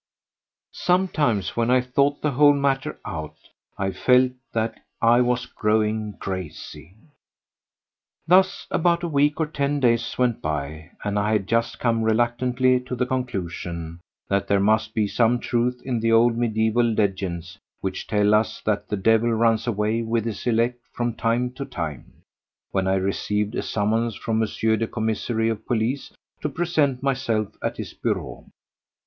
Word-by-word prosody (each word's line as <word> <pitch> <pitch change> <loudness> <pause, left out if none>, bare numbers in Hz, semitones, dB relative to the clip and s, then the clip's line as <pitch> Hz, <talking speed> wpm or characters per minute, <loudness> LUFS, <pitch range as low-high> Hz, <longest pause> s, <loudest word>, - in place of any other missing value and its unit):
Sometimes 155 - +1
when 115 0 +1
I 130 0 +5
thought 140 +3 0
the 150 - +2
whole 145 +2 +5
matter 140 +1 -1
out 80 -1 -6 0.4
I 95 0 -1
felt 125 +5 +3 0.2
that 110 0 -2 0.2
I 120 +2 +5
was 125 0 +1
growing 105 0 0
crazy. 95 -1 -7
5. - - -26 1.3
Thus 190 +3 +3
about 170 0 +2
a - - 0
week 145 0 +2
or 160 - +2
ten 145 -1 -1
days 115 -3 +1
went 125 -3 +1
by 75 +1 -4
and 105 0 0
I 105 +1 +1
had 105 -3 +1
just 115 +2 0
come 115 -2 +1
reluctantly 120 +3 +2
to 125 0 -6
the 125 0 0
conclusion 85 -9 -4 0.3
that 100 0 0
there 100 - +3
must 110 +2 +1
be 105 -2 +2
some 115 +3 +2
truth 125 +1 0
in 125 -3 -1
the 115 0 +1
old 115 +1 +5
mediaeval 115 0 +1
legends 95 -5 -2 0.2
which 95 -1 -4
tell 105 0 +2
us 110 +1 +1
that 105 -1 -1
the 105 - -1
devil 115 +3 +3
runs 115 0 +2
away 110 0 0
with 115 0 -1
his 115 +1 -4
elect 120 +1 +1
from 120 -1 -1
time 120 +2 0
to 130 +2 -6
time, 80 - -7 0.5
when 95 -1 0
I 95 - +2
received 105 +2 -1
a - - -1
summons 110 +2 0
from 110 +2 -1
M. 110 - 0 0.3
the 115 - 0
Commissary 110 0 -1
of 110 -1 -3
Police 120 +4 -1 0.3
to 150 - -1
present 145 -5 0
myself 125 -6 -1
at - - -2
his - - -6
bureau. - - -3
115 Hz, 160 wpm, -24 LUFS, 105-125 Hz, 1.3 s, I